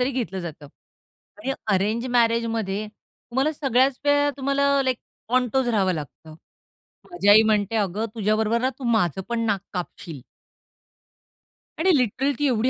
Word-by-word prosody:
तरी 250 Hz, +2 st, +1 dB
घेतलं 210 Hz, -8 st, -3 dB
जातं 160 Hz, -4 st, -8 dB, 0.7 s
आणि 270 Hz, -4 st, -2 dB, 0.2 s
अरेंज 215 Hz, +6 st, 0 dB
मॅरेजमध्ये 230 Hz, -3 st, +1 dB
तुम्हाला 265 Hz, +6 st, -4 dB
सगळ्याच 265 Hz, -2 st, +1 dB
वेळा 290 Hz, 0 st, +3 dB
तुम्हाला 275 Hz, +1 st, +1 dB, 0.2 s
लाइक 255 Hz, -2 st, 0 dB, 0.3 s
कॉन्टोज 255 Hz, +1 st, +1 dB
राहावं 195 Hz, -5 st, +2 dB
लागतं. 155 Hz, +1 st, -9 dB, 0.8 s
माझी 350 Hz, -13 st, -1 dB
आई 215 Hz, +2 st, +8 dB
म्हणते, 210 Hz, 0 st, +1 dB
"अगं 210 Hz, +1 st, -1 dB
तुझ्याबरोबर 220 Hz, +1 st, +1 dB
ना 260 Hz, +1 st, +1 dB
तू 265 Hz, -, -8 dB
माझं 190 Hz, -5 st, +1 dB
पण 235 Hz, -1 st, -1 dB
नाक 205 Hz, -3 st, 0 dB
कापशील." 175 Hz, -4 st, -6 dB, 1.6 s
आणि 355 Hz, +2 st, +3 dB
लिटरली 260 Hz, +4 st, 0 dB
ती 290 Hz, -, +1 dB
एवढी 245 Hz, 0 st, +1 dB
230 Hz, 135 wpm, -24 LUFS, 200-260 Hz, 1.6 s, आई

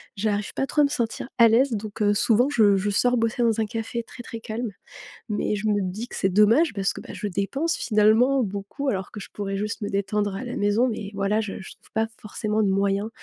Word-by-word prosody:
j'arrive 205 Hz, 0 st, -1 dB
pas 270 Hz, -, -1 dB
trop 300 Hz, -, +2 dB
à -, -, +6 dB
me -, -, 0 dB
sentir 235 Hz, -2 st, -2 dB
à 230 Hz, -1 st, +8 dB
l'aise, 250 Hz, +4 st, +4 dB
donc 215 Hz, 0 st, -5 dB
heu, 205 Hz, 0 st, +4 dB
souvent 235 Hz, +4 st, +3 dB
je 215 Hz, -7 st, +4 dB
je 205 Hz, +2 st, -1 dB
sors 245 Hz, +4 st, +3 dB
bosser 230 Hz, +1 st, 0 dB
dans 225 Hz, -1 st, +2 dB
un -, -, +1 dB
café 225 Hz, +1 st, -4 dB
très, 240 Hz, +1 st, -11 dB
très 230 Hz, -, -7 dB
calme. 225 Hz, 0 st, -4 dB, 0.6 s
Mais 210 Hz, 0 st, 0 dB
je 210 Hz, +2 st, -2 dB
me 205 Hz, -1 st, +2 dB
dis 195 Hz, +6 st, -4 dB
que -, -, -9 dB
c'est 190 Hz, -, +1 dB
dommage 225 Hz, -, +4 dB
parce 195 Hz, -1 st, 0 dB
que, -, -, -8 dB
bah, -, -, -10 dB
je 210 Hz, -, -4 dB
dépense 270 Hz, -, -1 dB
finalement 225 Hz, +5 st, +3 dB
beaucoup, 205 Hz, +8 st, -4 dB
alors 190 Hz, -4 st, -3 dB
que 210 Hz, -, -8 dB
je -, -, -9 dB
pourrais 195 Hz, -1 st, -3 dB
juste 210 Hz, +2 st, -3 dB
me 205 Hz, -, -3 dB
détendre 200 Hz, 0 st, -1 dB
à 225 Hz, -, -5 dB
la 245 Hz, -, -5 dB
maison. 205 Hz, +5 st, +2 dB
Mais 215 Hz, -3 st, -4 dB
voilà, 200 Hz, +2 st, +1 dB
je 205 Hz, -2 st, -5 dB
je -, -, -10 dB
trouve -, -, -25 dB
pas 220 Hz, 0 st, +1 dB
forcément 215 Hz, 0 st, -1 dB
de 195 Hz, -, +2 dB
moyens 200 Hz, +2 st, +1 dB
215 Hz, 245 wpm, -24 LUFS, 200-235 Hz, 0.6 s, à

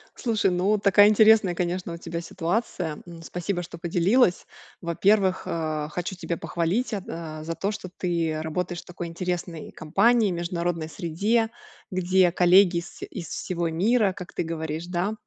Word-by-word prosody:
Слушай, 220 Hz, -6 st, +1 dB
ну 190 Hz, +4 st, +2 dB
такая 205 Hz, 0 st, +6 dB
интересная, 215 Hz, -4 st, +5 dB
конечно, 175 Hz, 0 st, -2 dB
у -, -, -6 dB
тебя 170 Hz, 0 st, -5 dB
ситуация. 170 Hz, -2 st, -2 dB
М, 170 Hz, -1 st, -10 dB
спасибо, 175 Hz, +2 st, -3 dB
что 170 Hz, 0 st, -10 dB
поделилась. 180 Hz, +5 st, +2 dB, 0.3 s
Во-первых, 190 Hz, +3 st, +2 dB
а, 155 Hz, -2 st, -2 dB
хочу 180 Hz, +4 st, -4 dB
тебя 170 Hz, -1 st, -4 dB
похвалить, 185 Hz, +9 st, -1 dB
а, 165 Hz, -5 st, -5 dB
за 165 Hz, +1 st, -4 dB
то, 200 Hz, +2 st, -1 dB
что 190 Hz, -3 st, -7 dB
ты 165 Hz, -3 st, -1 dB
работаешь 175 Hz, +2 st, -3 dB
в -, -, -40 dB
такой 175 Hz, -1 st, -6 dB
интересной 170 Hz, -1 st, -4 dB
компании, 205 Hz, +8 st, +3 dB
международной 170 Hz, -1 st, -2 dB
среде, 200 Hz, +8 st, 0 dB, 0.4 s
где 185 Hz, -1 st, +3 dB
коллеги 180 Hz, 0 st, +5 dB
из 170 Hz, -, -7 dB
из 170 Hz, -, -7 dB
всего 170 Hz, -2 st, -2 dB
мира, 200 Hz, +5 st, +2 dB
как 180 Hz, -1 st, -9 dB
ты -, -, -1 dB
говоришь, 160 Hz, 0 st, -4 dB
да. 180 Hz, +4 st, -1 dB
175 Hz, 155 wpm, -25 LUFS, 165-195 Hz, 0.4 s, такая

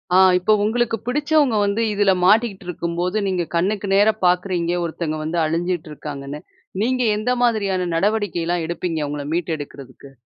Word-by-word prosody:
ஆ -, -, +7 dB, 0.2 s
இப்ப 180 Hz, +4 st, +2 dB
உங்களுக்கு 225 Hz, +1 st, 0 dB
பிடிச்சவங்க 290 Hz, -3 st, +2 dB
வந்து 200 Hz, +3 st, 0 dB
இதுல 200 Hz, -1 st, +3 dB
மாட்டிக்குட்டு 210 Hz, -1 st, +3 dB
இருக்கும்போது, 175 Hz, +3 st, -2 dB
நீங்க 185 Hz, -2 st, 0 dB
கண்ணுக்கு 200 Hz, +4 st, 0 dB
நேரா 205 Hz, +2 st, +5 dB
பார்க்குறீங்க, 180 Hz, -1 st, +1 dB
ஒருத்தங்க 160 Hz, -1 st, -3 dB
வந்து 165 Hz, +2 st, -2 dB
அழிஞ்சிட்டு 165 Hz, 0 st, -2 dB
இருக்காங்கன்னு. 145 Hz, 0 st, -7 dB, 0.4 s
நீங்க 255 Hz, +2 st, +1 dB
எந்த 220 Hz, +4 st, -1 dB
மாதிரியான 200 Hz, -6 st, +1 dB
நடவடிக்கைலாம் 175 Hz, -3 st, 0 dB
எடுப்பீங்க, 170 Hz, -1 st, -3 dB
அவுங்கள 145 Hz, 0 st, -5 dB
மீட்டு 170 Hz, -1 st, -1 dB
எடுக்குறதுக்கு? 140 Hz, -2 st, -11 dB
180 Hz, 140 wpm, -21 LUFS, 165-215 Hz, 0.4 s, ஆ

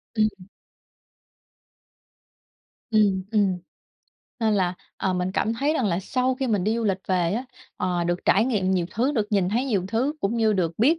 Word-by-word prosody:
Ừm. 215 Hz, -1 st, +4 dB, 2.6 s
Ừm, 200 Hz, -4 st, +3 dB
ừm. 200 Hz, -4 st, +2 dB, 0.8 s
Nên 220 Hz, -2 st, +2 dB
là, 185 Hz, -2 st, +1 dB, 0.2 s
ờ, 190 Hz, -, 0 dB
mình 180 Hz, +1 st, -1 dB
cảm 220 Hz, -, 0 dB
thấy 280 Hz, +6 st, +1 dB
rằng 250 Hz, -8 st, +1 dB
là 175 Hz, -2 st, +1 dB
sau 255 Hz, +5 st, 0 dB
khi 265 Hz, 0 st, -2 dB
mình 205 Hz, -6 st, +1 dB
đi 215 Hz, +2 st, +1 dB
du 230 Hz, -, -1 dB
lịch 190 Hz, -2 st, +1 dB
về 180 Hz, -1 st, +1 dB
á, 245 Hz, +4 st, -2 dB, 0.3 s
ờ, 175 Hz, -2 st, -1 dB
được 175 Hz, +1 st, -2 dB
trải 210 Hz, +4 st, +4 dB
nghiệm 200 Hz, -7 st, 0 dB
nhiều 180 Hz, -3 st, +1 dB
thứ, 255 Hz, +6 st, 0 dB
được 215 Hz, -6 st, 0 dB
nhìn 190 Hz, -3 st, +2 dB
thấy 235 Hz, +6 st, 0 dB
nhiều 205 Hz, -9 st, 0 dB
thứ 245 Hz, +8 st, 0 dB
cũng 210 Hz, +4 st, 0 dB
như 220 Hz, -1 st, +3 dB
được 175 Hz, -5 st, 0 dB
biết 295 Hz, +9 st, +4 dB
205 Hz, 185 wpm, -24 LUFS, 185-235 Hz, 2.6 s, Ừm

